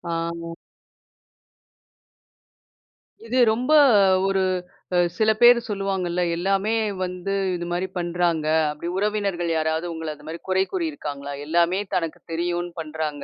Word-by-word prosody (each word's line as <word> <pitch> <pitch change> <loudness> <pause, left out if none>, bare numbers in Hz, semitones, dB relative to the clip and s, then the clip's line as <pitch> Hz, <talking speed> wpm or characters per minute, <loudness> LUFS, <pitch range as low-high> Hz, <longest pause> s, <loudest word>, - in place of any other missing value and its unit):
ஆமா. 170 0 -4 2.7
இது 255 - -1 0.2
ரொம்ப, 250 +6 -2 0.6
ஒரு 195 -1 +1 0.8
சில 220 0 +3
பேர் 240 0 +8
சொல்லுவாங்கள்ல, 190 -3 -1
எல்லாமே 195 +4 0 0.3
வந்து 180 +2 -3 0.2
இது 175 - -4
மாதிரி 180 +2 -1
பண்றாங்க. 170 -2 0 0.2
அப்படி 150 +3 -6
உறவினர்கள் 200 -4 -1
யாராவது 160 +2 0
உங்கள 160 -1 -5
அந்த 150 - -17
மாதிரி 165 +1 -7
குறை 190 0 +3
கூறி 350 -3 0
இருக்காங்களா? 145 - -6
எல்லாமே 170 +4 +2 0.2
தனக்கு 165 -3 -2
தெரியுன்னு 175 +1 -2
பண்றாங்க. 155 -2 -4
175 Hz, 115 wpm, -23 LUFS, 165-195 Hz, 2.7 s, பேர்